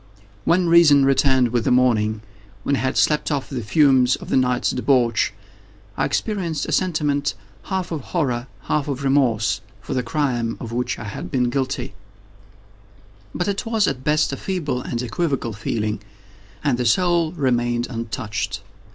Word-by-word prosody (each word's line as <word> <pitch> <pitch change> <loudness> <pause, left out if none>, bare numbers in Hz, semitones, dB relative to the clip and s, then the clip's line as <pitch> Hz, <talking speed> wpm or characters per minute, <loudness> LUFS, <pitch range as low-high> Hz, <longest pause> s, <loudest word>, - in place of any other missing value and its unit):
When 175 +1 +3
reason 160 -5 +6
returned 130 -2 +3
with 120 -1 0
the - - +1
morning—when 110 -2 0
I - - -2
had 130 +1 -1
slept 150 -1 +2
off 140 -3 -1
the 130 -3 -3
fumes 130 +2 +4
of - - -10
the - - +1
night's 125 -1 +2
debauch—I 105 -6 -1
experienced 175 -9 -1
a - - -5
sentiment 150 -6 0 0.3
half 190 -2 -3
of 160 -3 -3
horror, 125 -5 -2
half 150 -1 -1
of 140 -1 -3
remorse, 130 -6 +2 0.2
for - - -6
the 130 - +1
crime 120 -3 -1
of 115 - -7
which 125 +1 -2
I - - -7
had 105 -3 -6
been 125 +4 +1
guilty; 130 -3 -2 1.4
but 175 - -1
it 200 -1 -1
was, 225 -3 +2
at 130 -1 -3
best, 150 -1 +2
a - - -3
feeble 155 -9 -2
and 120 -1 -3
equivocal 130 -2 -2
feeling, 105 0 -2 0.6
and 130 -4 +1
the 125 - 0
soul 170 +4 +2
remained 120 -5 0
untouched. 110 -2 -4
130 Hz, 155 wpm, -22 LUFS, 115-150 Hz, 1.4 s, reason